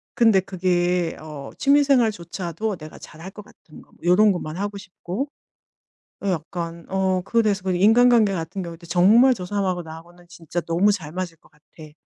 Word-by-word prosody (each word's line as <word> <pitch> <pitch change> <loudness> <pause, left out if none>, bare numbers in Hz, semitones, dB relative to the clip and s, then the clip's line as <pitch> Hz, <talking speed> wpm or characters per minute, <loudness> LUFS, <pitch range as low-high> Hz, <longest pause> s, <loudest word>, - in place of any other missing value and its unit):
근데 225 -5 +5
그게 180 -2 0
어 150 -3 -9
취미 285 +1 +4
생활조차도 210 - -1
내가 155 -1 -11
잘할 165 +5 -11
것 210 - -11
같은 155 - -17
거 - - -23
요런 190 +5 +5
것만 170 -3 -5
하고 205 +1 -4
싶고. 195 +6 -6 0.9
어 200 - -2
약간 170 -1 -4
어 190 -1 0
그거에 230 +5 +1
대해서 200 -3 -1
인간관계 225 +3 +4
같은 175 +2 -5
경우도 170 0 -9
'정말 205 +10 +5
저 185 -7 -5
사람하고 190 -2 -1
나하고는 170 +2 -13
진짜 170 0 -5
너무 175 +5 +2
잘 160 -7 -5
맞을 180 -1 -5
것 - - -25
같아.' 155 +1 -16
185 Hz, 340 characters per minute, -22 LUFS, 170-205 Hz, 0.9 s, 근데